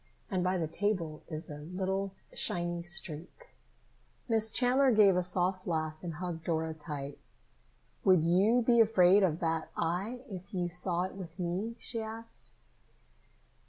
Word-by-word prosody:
And 185 -2 0
by 185 +1 +1
the 165 -3 -1
table 165 -3 -1
is 155 0 -5
a 150 -3 -7
little 190 +4 -3 0.2
shiny 175 -1 0
streak." 175 - -3 0.8
Miss 225 -2 +2
Chandler 250 +4 +4
gave 210 -5 +6
a 180 - +3
soft 185 +1 -1
laugh 155 -2 -1
and 170 -3 -5
hugged 170 -1 -5
Dora 160 -1 -1
tight. 145 -3 -7 0.8
"Would 185 -4 +5
you 200 +9 +4
be 235 -1 +5
afraid 205 -3 +6
of 170 -4 +2
that 165 -1 -1
eye 200 +10 -2
if 190 -1 -8
you 175 -1 0
saw 180 0 0
it 185 - -4
with 175 -3 -9
me?" 185 +6 -2
she 230 -1 -4
asked. 225 +1 -7
180 Hz, 150 wpm, -31 LUFS, 165-205 Hz, 0.8 s, gave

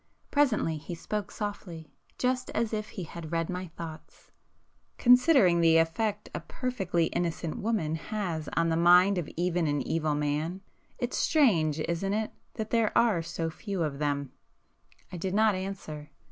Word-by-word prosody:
Presently 235 - +2
he 165 +3 -7
spoke 205 +4 -4
softly, 180 -8 -6 0.3
just 255 0 0
as 225 0 0
if 215 0 -3
he 190 - -6
had 165 -1 -8
read 165 +1 -1
my 180 0 -4
thoughts. 165 -1 -10 0.7
"Considering 250 - +5
the 165 -1 +5
effect 205 +6 0
a - - -2
perfectly 190 -10 -1
innocent 170 -2 -2
woman 205 -8 0
has 165 -2 -3
on 165 0 +2
the 165 - +1
mind 180 +3 +5
of 165 - -5
even 175 -1 +1
an 145 -1 -1
evil 155 -2 0
man, 150 +5 -1 0.4
it's 245 -1 -2
strange, 170 - +3
isn't 170 +5 -1
it 215 +1 -1 0.2
that 220 -2 -4
there 230 -2 +2
are 230 -7 +4
so 165 0 -3
few 195 0 -3
of 145 -3 -3
them!" 140 -2 -1 0.8
I 180 - -6
did 185 +3 -2
not 215 0 +4
answer. 185 -6 -6
175 Hz, 160 wpm, -29 LUFS, 160-215 Hz, 0.8 s, Considering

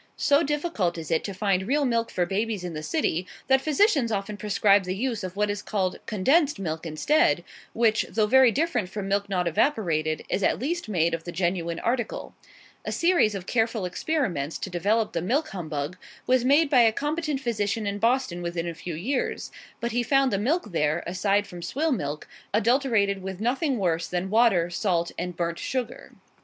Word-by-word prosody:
So 285 +1 +3
difficult 295 - -1
is 160 -2 -6
it 160 - +2
to 200 - -4
find 190 -1 0
real 285 +3 +2
milk 230 -2 0
for 180 - 0
babies 205 +1 -2
in 175 -2 -5
the 155 - -5
city, 185 - -1 0.2
that 265 0 +3
physicians 305 - +2
often 205 0 -2
prescribe 205 -1 +3
the 185 +1 -3
use 230 0 -2
of 185 0 -5
what 210 0 +1
is 205 0 -4
called 190 -3 -2
"condensed" 275 - +2
milk 165 -3 -4
instead; 165 - +2 0.3
which, 225 -1 +2
though 220 -1 +1
very 260 +2 +6
different 275 - 0
from 195 0 -5
milk 200 0 0
not 180 -3 0
evaporated, 165 - 0
is 200 - -1
at - - +2
least 330 0 -3
made 170 -4 +1
of 165 -1 -3
the 175 - -6
genuine 170 -2 -1
article. 240 0 -2 0.5
A - - -4
series 335 - +3
of 185 -2 -6
careful 225 -3 0
experiments 180 - -2
to 190 - -6
develop 210 +5 +1
the 170 - -1
milk 280 - 0
humbug 160 -3 -4 0.3
was 255 -1 +3
made 285 +5 +4
by 265 -3 +5
a 225 -1 +5
competent 295 +3 -2
physician 220 -4 -1
in 200 0 -2
Boston 230 -6 +1
within 170 -1 -3
a 170 - -3
few 165 +1 -6
years, 250 - -2 0.3
but 235 0 -2
he 245 - +1
found 270 +1 +2
the 195 - +1
milk 250 - 0
there 155 0 0
(aside 200 +3 +1
from 175 -3 -10
swill 305 - -1
milk) 150 - -3 0.3
adulterated 225 -4 +2
with 190 0 -6
nothing 265 +4 0
worse 170 -4 0
than 180 +2 -3
water, 215 -7 +4
salt, 175 -2 0
and 180 0 -4
burnt 170 -1 -2
sugar. 250 -3 -4
205 Hz, 190 wpm, -26 LUFS, 175-255 Hz, 0.5 s, very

